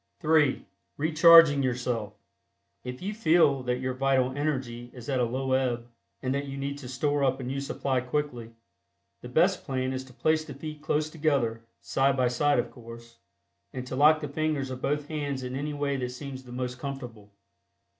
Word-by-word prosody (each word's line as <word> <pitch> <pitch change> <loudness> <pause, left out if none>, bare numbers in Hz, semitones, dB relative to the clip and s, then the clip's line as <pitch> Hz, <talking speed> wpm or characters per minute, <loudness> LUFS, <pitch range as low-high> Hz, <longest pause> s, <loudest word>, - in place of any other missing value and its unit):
(3) 155 -4 +3 0.3
RECHARGING 160 -1 +7
YOURSELF. 120 -4 -2 0.7
If 125 +5 -7
you 205 +2 -2
feel 165 -9 +3
that 125 0 -1
your 130 0 -1
vital 130 0 +1
energy 130 -5 -3
is 120 -2 -10
at 130 -2 +1
a 125 - +3
low 130 +2 -2
ebb, 120 -3 0 0.4
and 130 0 0
that 140 +1 -2
you 135 0 -6
need 140 +1 -4
to 130 - -8
store 145 +3 0
up 135 0 +1
a - - -5
new 135 +2 -3
supply 135 -2 -1
quickly, 125 -3 -3 0.7
the - - -8
best - - +2
plan 130 0 -2
is 130 0 -4
to 130 - -16
place 155 +4 +1
the 145 -3 -9
feet 155 +1 -7
close 155 0 0
together 140 -8 0 0.2
(side 135 0 +1
by 125 -1 +3
side, 145 +4 +2
of 120 - -1
course) 115 0 -12 0.5
and 130 -1 -5
to 130 - -5
lock 155 +3 +5
the 150 - -3
fingers 145 -2 -1
of 130 0 -6
both 145 0 -1
hands 145 -4 -3
in 125 0 -5
any 145 +2 -3
way 140 -1 -1
that 125 -1 -3
seems 130 +1 -8
the 125 - -12
most 125 0 -4
comfortable. 125 -7 -7
135 Hz, 190 wpm, -28 LUFS, 125-145 Hz, 0.7 s, RECHARGING